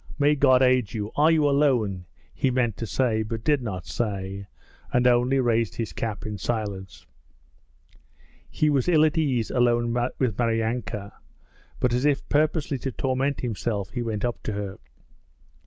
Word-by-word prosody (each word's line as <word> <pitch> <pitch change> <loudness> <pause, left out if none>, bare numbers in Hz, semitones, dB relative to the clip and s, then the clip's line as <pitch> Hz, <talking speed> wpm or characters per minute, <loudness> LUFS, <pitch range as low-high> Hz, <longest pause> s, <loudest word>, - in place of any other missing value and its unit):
May 145 +1 +4
God 130 -3 +4
aid 125 -5 +2
you! 105 -1 -3
Are 150 +2 +4
you 155 -3 +3
alone?' 120 - +1 0.3
he 135 - 0
meant 125 -4 0
to 115 - -4
say 115 -3 +1
but 110 +1 -4
did 145 0 +2
not 95 -7 -5
say, 100 -3 -4 0.4
and 125 0 +2
only 125 +2 +3
raised 115 -3 +1
his 115 - -4
cap 110 -2 -4
in 105 -2 -5
silence. 100 -3 -4 1.4
He 155 - 0
was 140 0 +1
ill 155 -3 +5
at 155 - +1
ease 135 -8 0
alone 120 -1 +2 0.2
with 125 -6 -1
Maryanka, 115 -3 -1 0.7
but 125 -1 +1
as 125 +2 0
if 145 -2 +1
purposely 150 -1 +1
to 135 - -3
torment 130 +4 -1
himself 110 -4 -3
he 120 - -3
went 110 -2 -2
up 120 - -3
to 110 - -4
her. 100 -1 -5
120 Hz, 160 wpm, -25 LUFS, 110-135 Hz, 1.4 s, ill